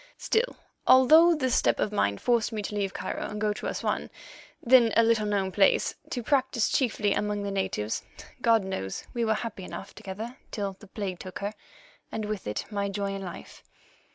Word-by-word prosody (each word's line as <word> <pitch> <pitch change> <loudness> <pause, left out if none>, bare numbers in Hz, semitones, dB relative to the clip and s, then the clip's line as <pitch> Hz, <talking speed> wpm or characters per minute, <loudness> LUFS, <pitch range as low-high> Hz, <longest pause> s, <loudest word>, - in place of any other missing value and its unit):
Still, 465 +3 0 0.3
although 315 +7 +7
this 260 -5 0
step - - +3
of 210 - 0
mine 100 - +1
forced 235 - +1
me 215 -2 -3
to 205 - -5
leave 200 -2 -1
Cairo - - -4
and 210 - -5
go 210 0 +1
to - - -5
Assouan, - - -2 0.5
then 240 -2 +5
a 230 - +7
little 225 -2 +2
known 195 -2 0
place, 195 0 +3 0.2
to 245 - -3
practise 265 -3 +1
chiefly 215 -6 +1
among 210 0 -1
the 200 - -3
natives, 110 - -2 0.4
God 230 -3 +4
knows 95 - -4
we 235 - -1
were 220 -1 +2
happy 210 -3 -5
enough 195 - -8
together 220 +6 -7
till 200 -2 -3
the 210 - -14
plague 195 -3 -5
took 185 -1 -7
her, 205 +2 -3 0.6
and 220 -1 -3
with 210 - -4
it 105 - -3
my 200 -1 -1
joy 200 0 -2
in 195 - -5
life. 185 -2 -9
210 Hz, 190 wpm, -28 LUFS, 195-235 Hz, 0.6 s, although